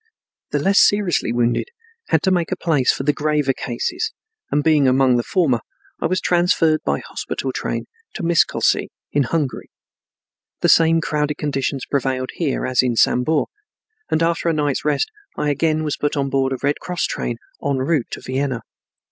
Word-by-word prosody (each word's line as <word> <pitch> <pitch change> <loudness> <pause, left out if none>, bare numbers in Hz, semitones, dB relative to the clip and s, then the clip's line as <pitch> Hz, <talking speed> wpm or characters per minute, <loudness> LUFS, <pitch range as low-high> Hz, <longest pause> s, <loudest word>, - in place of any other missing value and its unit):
The - - 0
less 195 +1 +3
seriously 200 - +3
wounded 120 0 +1 0.4
had - - +2
to 190 - +2
make 175 -3 +1
place 150 -7 +2
for - - -4
the 145 +1 +2
graver 150 -2 +1
cases, 125 - -3 0.4
and 145 - +1
being 150 -3 +4
among 130 -1 +4
the - - +2
former, 145 - +1 0.4
I - - +2
was 185 +2 0
transferred 170 -3 +2
by - - -1
hospital - - -4
train - - -3 0.3
to 205 - -5
Miscolcy 170 0 +2 0.2
in 145 - +2
Hungary. 145 -1 -2 0.9
The - - +3
same 165 0 +5
crowded 150 -1 -1
conditions 140 -2 -2
prevailed 130 -2 -1
here 150 -6 -1
as 130 -1 +3
in 125 -2 0
Sambor, 145 +7 +2 0.6
and 160 - +1
after 170 0 +1
a - - +2
night's 145 -3 0
rest 150 - 0 0.3
I 150 - +1
again 155 +2 +1
was 150 -2 -2
put 145 0 -1
on 140 -1 -1
board 135 -1 +1
a 130 - -1
Red 145 +1 +1
Cross 180 -1 -2
train 120 - -3 0.3
en 140 -1 0
route 135 -1 0
to - - -7
Vienna. 130 -2 -2
145 Hz, 175 wpm, -20 LUFS, 130-165 Hz, 0.9 s, same